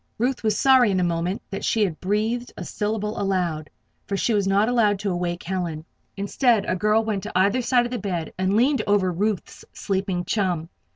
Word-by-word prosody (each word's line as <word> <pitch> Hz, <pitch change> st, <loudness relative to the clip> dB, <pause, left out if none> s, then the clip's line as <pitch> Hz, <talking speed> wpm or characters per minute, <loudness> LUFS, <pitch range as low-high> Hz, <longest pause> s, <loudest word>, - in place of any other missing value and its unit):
Ruth 245 Hz, +3 st, 0 dB
was 215 Hz, -2 st, +1 dB
sorry 260 Hz, -4 st, +5 dB
in 190 Hz, -2 st, +1 dB
a -, -, +2 dB
moment 175 Hz, +3 st, -1 dB
that 195 Hz, -, -5 dB
she 220 Hz, -, +2 dB
had 175 Hz, -6 st, -2 dB
breathed 220 Hz, +5 st, -1 dB
a 180 Hz, -, -6 dB
syllable 210 Hz, +2 st, -2 dB
aloud; 175 Hz, -6 st, -1 dB, 0.4 s
for 200 Hz, -, -1 dB
she 230 Hz, -, +1 dB
was 200 Hz, -2 st, +1 dB
not 200 Hz, +2 st, +3 dB
allowed 225 Hz, -4 st, +3 dB
to 200 Hz, 0 st, -2 dB
awaken 175 Hz, +1 st, -3 dB
Helen. 165 Hz, -4 st, -3 dB, 0.3 s
Instead, 210 Hz, +2 st, +2 dB
a -, -, 0 dB
girl 215 Hz, +4 st, +2 dB
went 210 Hz, -3 st, -1 dB
to -, -, -6 dB
either 200 Hz, +7 st, +3 dB
side 245 Hz, 0 st, +2 dB
of 240 Hz, -, -5 dB
the 245 Hz, -, -2 dB
bed 175 Hz, -5 st, -3 dB
and 190 Hz, +2 st, 0 dB
leaned 260 Hz, +5 st, +3 dB
over 200 Hz, -3 st, +2 dB
Ruth's 200 Hz, +1 st, -2 dB
sleeping 190 Hz, -3 st, -2 dB
chum. 180 Hz, -6 st, -1 dB
200 Hz, 205 wpm, -23 LUFS, 180-220 Hz, 0.4 s, sorry